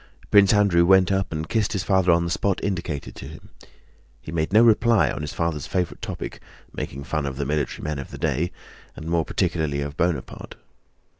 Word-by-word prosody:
Prince 100 -2 +6
Andrew 100 -5 +4
went 95 +1 +5
up 95 0 0
and 80 0 -4
kissed 110 +1 0
his 95 - -1
father 95 -2 +3
on 85 0 +3
the 85 - -3
spot 100 +2 0
indicated 85 -7 -3
to - - -8
him. - - -12 0.7
He 75 - -9
made 80 0 -1
no 110 +3 +6
reply 115 -1 +4
on - - -5
his 75 - -4
father's 85 -4 -2
favorite 90 -2 -2
topic—making 70 +1 -7
fun 75 -1 -2
of 65 -1 -5
the 70 - -2
military 75 0 -2
men 75 -2 -3
of 70 - -7
the - - -9
day, 85 +7 -1 0.4
and 80 - -9
more 85 -1 0
particularly 80 -6 -1
of 70 0 -5
Bonaparte. 85 -7 -2
85 Hz, 195 wpm, -23 LUFS, 75-95 Hz, 0.7 s, Prince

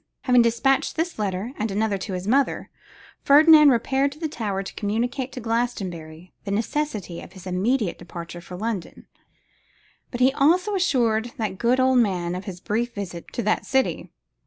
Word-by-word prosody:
Having 250 -2 +4
despatched 235 +4 +1
this 330 -4 -2
letter 200 +4 -2
and 215 +1 -1
another 205 0 -1
to 190 +1 -5
his 180 +1 -4
mother, 270 +4 +1 0.5
Ferdinand 300 +1 +7
repaired 270 +3 +1
to - - -17
the 325 - -2
tower 205 -9 -3
to - - -8
communicate 245 +5 -2
to - - -6
Glastonbury 185 -8 -4
the 200 - -6
necessity 215 - -2
of - - -13
his 190 -1 -13
immediate 195 +3 0
departure 170 0 -8
for 180 +1 -9
London, 210 -3 -5 1.0
but 245 - -6
he 260 +1 +4
also 355 +9 +2
assured 240 - +1
that 205 -4 -3
good 240 +2 +2
old 260 -1 +4
man 180 -6 0
of 185 +1 -5
his 185 -3 -7
brief 235 +5 -2
visit 180 -4 -7
to 240 - -2
that 210 - +1
city. 265 -1 0
225 Hz, 170 wpm, -24 LUFS, 190-260 Hz, 1.0 s, Ferdinand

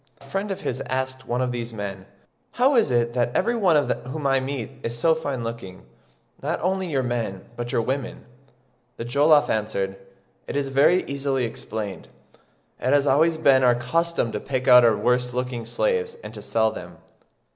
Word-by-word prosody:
A - - -17
friend 195 +9 -3
of 195 - -4
his 130 +1 -3
asked 130 0 -3
one 125 +1 -1
of 125 - -1
these 120 -1 -5
men, 100 -2 -6 0.5
"How 265 +3 +3
is 225 - +4
it 120 -1 +1
that 120 -1 +1
every 240 - +2
one 175 -10 +3 0.2
whom 145 +2 -5
I 135 -1 +3
meet 130 -2 -4
is 115 -1 -4
so 160 +7 +4
fine 140 -6 -3
looking, 115 -5 -7 0.6
not - - -2
only 190 +1 0
your 135 -4 0
men 115 -6 -3
but 120 0 -5
your 115 - +1
women?" 130 +1 -4 0.7
The 115 - -5
Jollof 145 +4 +4
answered, 100 -3 -2 0.5
"It - - -5
is 140 -1 -1
very 145 +7 +4
easily 140 -2 -1
explained: 110 -3 -6 0.7
it 130 +3 +1
has 145 -1 +4
always 160 +4 +3
been 140 -4 +5
our 125 -1 +5
custom 125 +2 0
to 105 - -3
pick 130 +1 -3
out 125 -1 +9
our 115 -3 +4
worst 125 +3 0
looking 125 -2 -3
slaves 465 - -1
and - - -8
to - - -8
sell - - +1
them." - - -9
130 Hz, 185 wpm, -24 LUFS, 120-145 Hz, 0.7 s, out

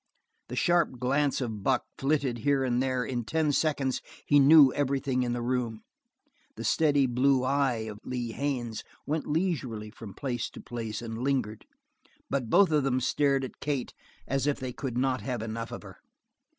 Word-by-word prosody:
The - - -5
sharp 170 -7 +2
glance 140 +3 +1
of 110 -5 -3
Buck 130 +4 +2 0.2
flitted 135 -4 0
here 140 +3 +2
and 125 -1 +1
there, 130 -1 0
in 120 -2 -2
ten 155 +6 +1
seconds 140 -3 0 0.2
he 145 - +5
knew 140 -1 +8
everything 135 -2 0
in 120 -1 0
the 120 -1 -3
room; 120 -3 -2 0.7
the - - -6
steady 145 -3 +3
blue 130 +1 +2
eye 130 -4 +1
of 105 -1 -7
Lee 120 -2 -3
Haines 120 -4 -3 0.2
went 155 +2 -2
leisurely 145 - -1
from 105 -2 -10
place 125 -4 -3
to - - -11
place 115 -2 -5
and 115 -1 -5
lingered; 125 -5 -1 0.6
but 130 -5 -1
both 190 - +5
of 150 -1 +3
them 130 -1 +1
stared 135 +1 +1
at 130 - -7
Kate 140 -3 -2 0.3
as 135 +1 0
if 145 - 0
they 130 -1 -4
could 125 -2 -4
not 130 0 +1
have 125 -4 -3
enough 115 +1 -5
of - - -7
her. - - -12
130 Hz, 175 wpm, -28 LUFS, 120-140 Hz, 0.7 s, knew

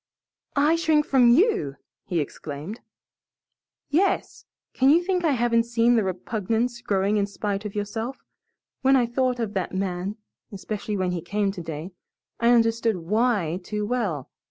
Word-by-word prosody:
"I 295 +3 +4
shrink 315 -2 +2
from 255 -3 +5
YOU!" 245 - +3 0.3
he 175 - -1
exclaimed. 150 - -6 1.1
"Yes. 350 +7 0 0.3
Can 265 +1 +3
you 335 +4 +5
think 365 -1 0
I 315 -4 +3
haven't 230 -2 +2
seen 235 0 +3
the 225 - +3
repugnance 225 +5 -2
growing 200 -1 +1
in 200 -1 +1
spite 200 0 -3
of 210 - -6
yourself? 220 +5 -3 0.6
When 270 +1 +5
I 250 -2 +4
thought 250 +1 0
of 220 -3 -2
that 190 -1 -2
man 190 +1 -2 0.3
especially 205 +1 -4
when 185 -1 0
he 175 -2 -3
came 200 +3 -1
today 165 -1 -6 0.5
I 235 - +3
understood 230 -1 +3
WHY 190 -2 0
too 210 +3 -3
well. 205 - -2
220 Hz, 150 wpm, -25 LUFS, 195-245 Hz, 1.1 s, from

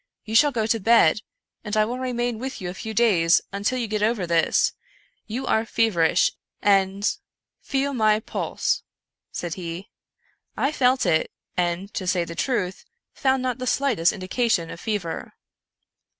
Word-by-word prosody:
You 220 - -6
shall 290 +6 +6
go 225 -4 -1
to 225 +1 +1
bed, 215 -3 +5 0.4
and 210 0 -3
I 215 - +4
will 245 +3 -4
remain 245 -2 -2
with 265 +2 -5
you 180 -2 -4
a - - -8
few 220 +4 -6
davs, 195 -7 +4
until 205 +6 -1
you 240 - -1
get 215 -1 -2
over 215 -3 +1
this. 170 -1 +2 0.5
You 240 +4 -4
are 220 - +2
feverish 220 -8 +2 0.3
and 195 +1 +2 0.2
' - - -66
" - - -66
" - - -58
Feel 280 0 +1
my 215 -3 +3
pulse," - - -2 0.5
said 175 -2 -4
he. 175 +1 -7 0.7
I 275 - +1
felt 255 -4 +2
it, 165 -3 +2 0.3
and, 180 +3 -1
to 185 - -4
say 180 -2 +1
the 170 - -7
truth, 190 -2 -2 0.3
found 265 -1 +1
not 255 -1 -2
the 255 - -4
slightest 245 -13 +2
indication 185 -3 -1
of 165 - -8
fever. 195 -7 -4
215 Hz, 170 wpm, -24 LUFS, 180-245 Hz, 0.7 s, shall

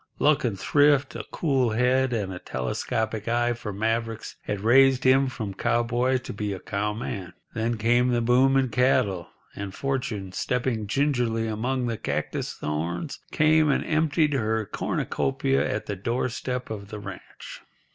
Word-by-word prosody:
Luck 150 0 +3
and 110 -6 -1
thrift, 145 +1 +3
a - - -4
cool 135 -7 +1
head, 125 +3 +2
and 100 -5 -2
a 90 - -6
telescopic 110 - -3
eye 120 +1 +2
for 115 -3 -6
mavericks 115 +2 -2
had 105 -2 -3
raised 130 +3 +5
him 130 +1 +5
from 110 -6 -5
cowboy 120 +4 +1
to 125 - -7
be 105 0 -3
a 95 - -6
cowman. 105 -1 -3 0.2
Then 115 0 -1
came 120 +3 +3
the 120 -1 +2
boom 125 +3 +4
in 130 -2 +2
cattle, 120 -8 +1 0.3
and 100 -1 -6
Fortune, 125 -8 -2
stepping 120 0 -1
gingerly 120 -3 +1
among 125 +4 -1
the 115 -2 -2
cactus - - -2
thorns, 85 - -3
came 155 0 +4
and 140 - +1
emptied 155 -1 +2
her 110 -4 0
cornucopia 135 +6 -1
at 105 - -3
the 100 - -3
doorstep 125 +4 -3
of 100 -2 -6
the 110 0 -7
ranch. 105 - -9
120 Hz, 155 wpm, -26 LUFS, 105-130 Hz, 0.3 s, raised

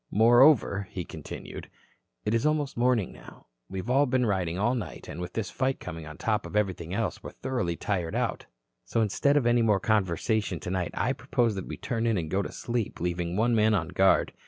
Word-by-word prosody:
"Moreover," 115 -3 +5
he 90 -3 -5
continued, 80 -2 -8 0.6
"it 105 - +1
is 115 - +2
almost 150 -2 0
morning 120 -4 +1
now. - - -14 0.2
We 95 -1 -4
all 125 +5 +2
have 145 -2 +3
been 125 0 +2
riding 90 -5 0
all 105 +6 +2
night 120 -4 -5
and 85 - -6
with 90 0 -6
this 110 -5 -3
fight 135 0 -1
coming 80 -1 -7
on 75 - -9
top 110 -2 -1
of - - -9
everything 95 -5 -1
else, 105 +3 -2
we - - -7
are - - -17
thoroughly 120 -10 -2
tired 90 -3 -2
out. - - -2 0.4
So, - - 0
instead 140 +7 +2
of 135 - +2
any 120 0 +4
more 105 -3 +3
conversation 105 -1 0
tonight, 90 -1 -2
I - - +1
propose 115 -3 0
that 95 -2 -5
we - - -6
turn 115 -1 -2
in 115 -3 +2
and 80 -3 -3
go 95 - +2
to - - -5
sleep, 120 -3 -3
leaving 85 0 -2
one 115 +4 +2
man 110 -1 +4
on 85 -4 -1
guard. 95 +2 +3
105 Hz, 215 wpm, -28 LUFS, 90-120 Hz, 0.6 s, Moreover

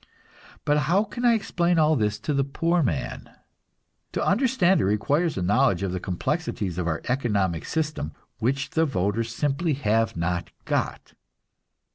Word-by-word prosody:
But 150 0 +3
how 195 +4 +4
can 240 +2 -7
I 235 -1 +6
explain 175 -5 0
all 155 0 +4
this 105 -4 0
to 150 - -1
the 140 0 +2
poor 165 +5 0
man? 85 - -2 0.8
To - - -1
understand 200 -4 +3
it - - +1
requires 145 - +1
a 95 - -1
knowledge 100 -1 +2
of 95 - -1
the 90 - -2
complexities 100 - -2
of 85 - -1
our 80 -1 -2
economic 100 -10 0
system 155 - -2 0.3
which 135 +5 -1
the 160 0 +2
voters 110 -1 -1
simply 145 +6 0
have 115 -6 +1
not 85 +1 -1 0.2
got. - - -2
135 Hz, 155 wpm, -25 LUFS, 100-160 Hz, 0.8 s, I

